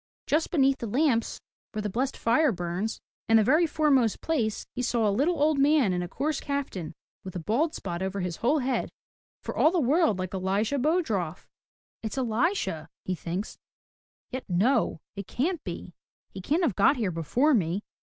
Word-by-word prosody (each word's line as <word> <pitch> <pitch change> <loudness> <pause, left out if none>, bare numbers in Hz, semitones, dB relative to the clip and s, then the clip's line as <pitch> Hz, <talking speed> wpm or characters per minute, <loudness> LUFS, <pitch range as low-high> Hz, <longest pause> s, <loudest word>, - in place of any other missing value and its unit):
Just 310 +2 +1
beneath 270 -4 +3
the 235 - -4
lamps 245 0 +1 0.3
where 215 - -2
the - - -1
blessed 260 +6 -1
fire 255 +5 +3
burns, 180 +3 -3 0.3
in 225 - +7
the 220 - +5
very 310 +9 +4
fore 305 -1 +1
most 245 -6 +3
place, 235 -10 -1
he 250 - -3
saw 235 -3 +1
a - - +3
little 295 - +1
old 300 0 +3
man 280 -8 +4
in 180 - -1
a 175 - -3
coarse 295 - -2
kaftan, 230 - -4 0.3
with 185 -1 -8
a - - -2
bald 240 - 0
spot 175 +1 -4
over 190 +1 -2
his 180 -2 -3
whole 275 +7 +2
head, 260 -2 -1 0.3
— - - -83
for - - -5
all - - +5
the 350 +1 +1
world 300 - +3
like 185 0 -4
Elisha 200 +8 0
Bodroff. 235 - 0 0.5
"It's 220 +4 -5
Elisha," 240 - 0 0.2
he 185 - -1
thinks. 180 +4 -5 0.7
"Yet 260 0 -5
no! 210 - +2
It 200 -2 -6
can't 320 +6 -1
be! 175 -1 -7 0.4
He 190 - -8
can't 310 - +1
have 260 - +1
got 265 +8 +4
here 210 -6 0
before 235 - +2
me. 190 -2 +1
235 Hz, 190 wpm, -27 LUFS, 190-290 Hz, 0.7 s, in